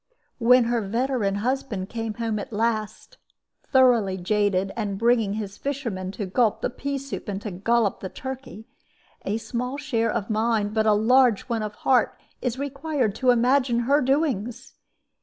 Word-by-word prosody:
When 250 +1 +6
her 235 0 0
veteran 225 -1 0
husband 245 -7 -2
came 225 -2 -4
home 225 -2 -2
at 205 - -7
last 220 -1 -2 0.5
(thoroughly 240 -8 +4
jaded, 195 0 +1
and 205 -4 -3
bringing 230 -2 +2
his 205 -1 -5
fishermen 235 -10 -3
to 200 +1 -4
gulp 220 +3 +1
the - - -1
pea 280 +3 -3
soup 270 -4 -6
and 195 -1 -3
to 210 - -4
gollop 210 +3 +1
the 190 - -6
turkey), 260 -4 -8 0.6
a 205 +3 0
small 250 +4 -4
share 235 -7 0
of 210 -2 -2
mind, 215 -1 0
but 220 0 +1
a 215 - +6
large 235 +1 +4
one 230 -3 -2
of 210 -1 -4
heart, 255 -3 +3 0.2
is 250 -1 -2
required 275 -4 -1
to 255 +4 0
imagine 245 0 +3
her 280 +5 +3
doings. 260 -3 -1
230 Hz, 160 wpm, -24 LUFS, 210-255 Hz, 0.6 s, When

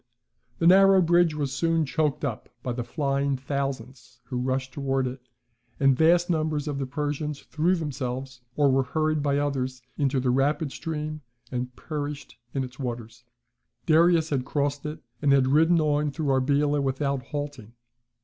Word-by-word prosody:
] - - -44
The - - -1
narrow 195 +2 +7
bridge 175 -2 +3
was 140 -3 -2
soon 165 +2 +1
choked 150 +1 0
up 120 -6 -4
by 125 - -2
the 120 0 -3
flying 140 0 -1
thousands 130 -2 -5
who 125 - -4
rushed 130 0 -2
towards 135 -2 0
it, 125 +1 -6 0.6
and 135 -1 +4
vast 170 +4 +4
numbers 155 -3 -1
of 145 -2 -2
the 135 - -2
Persians 150 +1 -3
threw 170 +5 +1
themselves, 130 -5 -4
or 145 -2 +4
were 135 +1 +3
hurried 155 +3 0
by 140 -1 +1
others, 130 -3 -2 0.2
into 135 -2 +1
the 125 -1 +1
rapid 140 +3 +1
stream, 155 0 -4 0.3
and 125 0 -4
perished 145 -2 -5 0.2
in 135 - 0
its 125 +1 -9
waters. 120 -2 -6 0.6
Darius 165 0 +4
had 135 -3 0
crossed 145 +1 -2
it, 150 -2 -7 0.2
and 145 -2 +3
had 135 -1 +4
ridden 160 +4 +4
on 150 -1 +1
through 145 +1 -3
Arbela 145 +2 +2
without 140 0 -1
halting. 145 -6 -6
140 Hz, 165 wpm, -26 LUFS, 130-155 Hz, 0.6 s, narrow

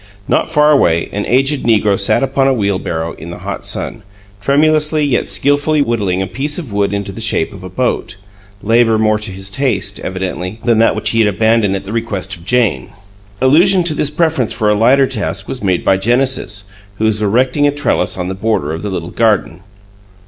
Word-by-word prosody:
Not - - 0
far 150 -1 +4
away, 85 - +2
an 105 - -3
aged 135 +3 +2
negro 105 -3 +2
sat 100 +7 +2
upon 135 0 +1
a 135 - +3
wheelbarrow 95 -6 -2
in 80 +3 -9
the 85 - -7
hot - - -5
sun, - - -4 0.4
tremulously 150 +3 +2
yet 130 -7 0
skilfully 145 +8 +2
whittling 100 -7 -1
a - - -2
piece 145 +8 -3
of 145 - -6
wood 100 -1 0
into 100 -1 -3
the 115 - -8
shape 105 -7 0
of 95 -2 -11
a 95 - -7
boat, 125 -1 -2 0.5
labor 115 0 +3
more 110 -1 +2
to 105 0 -5
his 95 +1 -5
taste, 115 -4 -1
evidently, 95 +2 -5
than 115 -2 +2
that 115 - +3
which - - -1
he 115 - 0
had 110 - +4
abandoned 110 0 +2
at 95 - -4
the 100 +2 -7
request 100 -5 -3
of 85 -1 -15
Jane. 105 - 0 0.5
Allusion 175 +8 +4
to 170 -2 0
this 150 -1 -1
preference 150 -6 0
for 110 -3 +1
a - - +4
lighter 130 +6 +4
task 105 -6 -3
was 130 - -6
made 95 -3 0
by 95 - +3
Genesis, 120 -1 0 0.3
who 110 - -1
was 110 -1 +1
erecting 125 +7 +2
a - - +2
trellis 145 -7 -1
on 90 -1 -3
the 95 - -3
border 95 -7 -1
of 80 - -5
the 105 - -4
little 85 -3 -5
garden. 105 -6 0
110 Hz, 205 wpm, -15 LUFS, 95-135 Hz, 0.5 s, far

